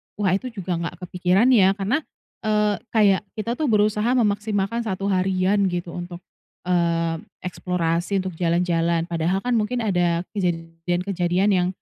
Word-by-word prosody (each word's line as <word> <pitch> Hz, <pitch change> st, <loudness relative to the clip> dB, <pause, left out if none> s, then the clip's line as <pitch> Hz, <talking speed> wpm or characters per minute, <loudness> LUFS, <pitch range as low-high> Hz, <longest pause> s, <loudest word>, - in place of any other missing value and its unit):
wah 200 Hz, -3 st, +1 dB
itu 195 Hz, +7 st, 0 dB
juga 185 Hz, -4 st, -3 dB
nggak 170 Hz, +2 st, -5 dB
kepikiran 180 Hz, +6 st, +2 dB
ya 195 Hz, -5 st, +5 dB
karena, 210 Hz, +9 st, 0 dB, 0.5 s
eee, 210 Hz, -1 st, +2 dB, 0.2 s
kayak 205 Hz, -4 st, +4 dB
kita 230 Hz, +2 st, -3 dB
tuh 310 Hz, -, 0 dB
berusaha 210 Hz, 0 st, +2 dB
memaksimalkan 210 Hz, -1 st, 0 dB
1 195 Hz, -1 st, -2 dB
harian 190 Hz, +1 st, +2 dB
gitu 175 Hz, -1 st, -3 dB
untuk, 175 Hz, 0 st, -7 dB, 0.4 s
eee, 170 Hz, -2 st, +1 dB, 0.3 s
eksplorasi, 180 Hz, +1 st, -1 dB
untuk 185 Hz, -3 st, -6 dB
jalan-jalan 170 Hz, -1 st, +1 dB
padahal 170 Hz, +3 st, 0 dB
kan 245 Hz, -1 st, +1 dB
mungkin 230 Hz, +3 st, -1 dB
ada 175 Hz, -4 st, +1 dB, 0.2 s
kejadian-kejadian 175 Hz, +2 st, -1 dB
yang 180 Hz, -2 st, +2 dB
185 Hz, 135 wpm, -23 LUFS, 175-210 Hz, 0.5 s, ya